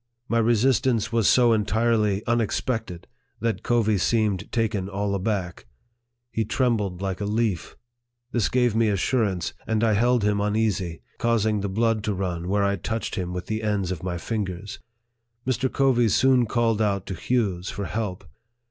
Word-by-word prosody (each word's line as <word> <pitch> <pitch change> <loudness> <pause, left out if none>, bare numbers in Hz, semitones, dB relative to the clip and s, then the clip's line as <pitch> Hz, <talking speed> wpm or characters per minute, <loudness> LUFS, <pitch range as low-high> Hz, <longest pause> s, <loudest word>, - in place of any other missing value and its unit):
My 115 - +1
re 115 +1 +3
sistance 125 -1 +2
was 115 -3 +3
'so 120 -2 +5
entirely 110 -1 +1
unexpected, 115 -4 -1 0.3
that 115 0 -1
Covey 110 -4 +2
seemed 105 -2 0
taken 105 -4 -1
all 100 0 -2
aback. 95 - -2 0.6
He 110 - 0
trembled 105 -6 0
like 95 0 -3
a - - -1
leaf. 105 -4 -1 0.6
This 120 -3 +1
gave 125 -3 +2
me 115 0 +3
assurance, 100 -2 0
and 110 0 +1
I 110 -2 +3
held 120 +2 +2
him 105 0 +1
uneasy, 105 -5 -1 0.2
causing 110 -3 +1
the 100 - -2
blood 110 +1 +1
to 105 -2 -1
run 90 -2 -3
where 100 +2 +1
I 100 0 +1
touched 110 +5 -3
him 90 -4 -3
with 90 -1 -5
the 110 0 -3
ends 105 -4 -1
of 85 -5 -4
my 90 -1 -3
fingers. 100 -1 -4 0.7
Mr. 130 +1 0
Covey 125 -4 +3
soon 125 +2 +4
called 115 -1 +1
out 100 -3 0
to 95 - -5
Hughes 95 -3 -1
for 100 - -4
help." 100 0 -4
105 Hz, 165 wpm, -25 LUFS, 100-115 Hz, 0.7 s, so